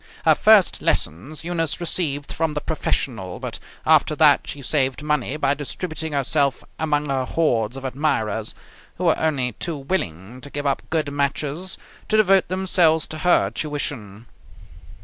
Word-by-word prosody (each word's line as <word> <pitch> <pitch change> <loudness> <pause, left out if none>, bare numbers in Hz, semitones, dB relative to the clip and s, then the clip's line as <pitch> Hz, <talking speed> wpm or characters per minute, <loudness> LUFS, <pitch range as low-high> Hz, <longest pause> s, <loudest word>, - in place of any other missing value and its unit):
Her - - +7
first - - +5
lessons 130 - -1
Eunice 165 -2 -1
received 150 -5 -2
from 160 -2 -1
the - - 0
professional, 115 - -2
but - - -6 0.3
after - - +4
that - - +4
she 140 - -4
saved 135 +1 0
money 150 -2 0
by 140 -2 +2
distributing 155 +2 -5
herself 140 0 +1 0.2
among 150 -2 0
her 135 -2 0
hordes 125 -5 0
of 135 - -7
admirers, 125 -6 -1 0.4
who 180 - -4
were 165 -3 +3
only 140 -6 0
too 160 +8 -4
willing 125 - -4
to 145 - -9
give 145 +1 -4
up 140 -1 +1
good 155 -3 -1
matches 145 +5 -2 0.3
to 215 - +3
devote 195 -3 +4
themselves 175 -4 +3
to 155 - -6
her 175 - +3
tuition. 120 -7 -4
145 Hz, 150 wpm, -22 LUFS, 130-160 Hz, 0.4 s, Her